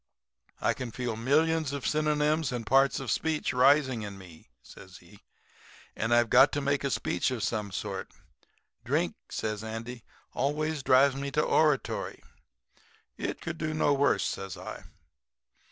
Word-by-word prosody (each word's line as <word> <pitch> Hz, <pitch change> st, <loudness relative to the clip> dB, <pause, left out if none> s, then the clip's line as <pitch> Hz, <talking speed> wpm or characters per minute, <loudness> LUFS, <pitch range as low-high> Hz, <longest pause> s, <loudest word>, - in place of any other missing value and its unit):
I -, -, +1 dB
can 130 Hz, -2 st, -6 dB
feel 120 Hz, -1 st, -4 dB
millions 155 Hz, +5 st, +1 dB
of 140 Hz, -3 st, -4 dB
synonyms 150 Hz, -1 st, +1 dB
and 120 Hz, -2 st, -4 dB
parts 135 Hz, +4 st, +3 dB
of 135 Hz, -5 st, -3 dB
speech 155 Hz, -1 st, -1 dB
rising 130 Hz, -1 st, +4 dB
in 100 Hz, -2 st, -7 dB
me,' 90 Hz, -4 st, -15 dB
says -, -, -13 dB
he, -, -, -18 dB, 0.8 s
'and 110 Hz, +2 st, -2 dB
I've 120 Hz, -1 st, +3 dB
got -, -, +7 dB
to 145 Hz, -, 0 dB
make 140 Hz, 0 st, 0 dB
a 140 Hz, -, 0 dB
speech 90 Hz, -4 st, 0 dB
of 125 Hz, -5 st, -3 dB
some 105 Hz, -1 st, -2 dB
sort. 95 Hz, -1 st, -5 dB, 0.7 s
Drink,' -, -, 0 dB, 0.2 s
says 110 Hz, -1 st, -3 dB
Andy, 115 Hz, +2 st, -6 dB, 0.3 s
'always 150 Hz, +2 st, -1 dB
drives 135 Hz, +1 st, +4 dB
me 140 Hz, +1 st, -3 dB
to 150 Hz, +2 st, +1 dB
oratory.' 150 Hz, -4 st, +1 dB, 0.9 s
"'It -, -, -4 dB
could 165 Hz, 0 st, -5 dB
do 155 Hz, 0 st, -2 dB
no 145 Hz, -2 st, +3 dB
worse,' 140 Hz, 0 st, +2 dB
says 95 Hz, -1 st, -4 dB
I. -, -, -8 dB
135 Hz, 155 wpm, -29 LUFS, 115-150 Hz, 0.9 s, got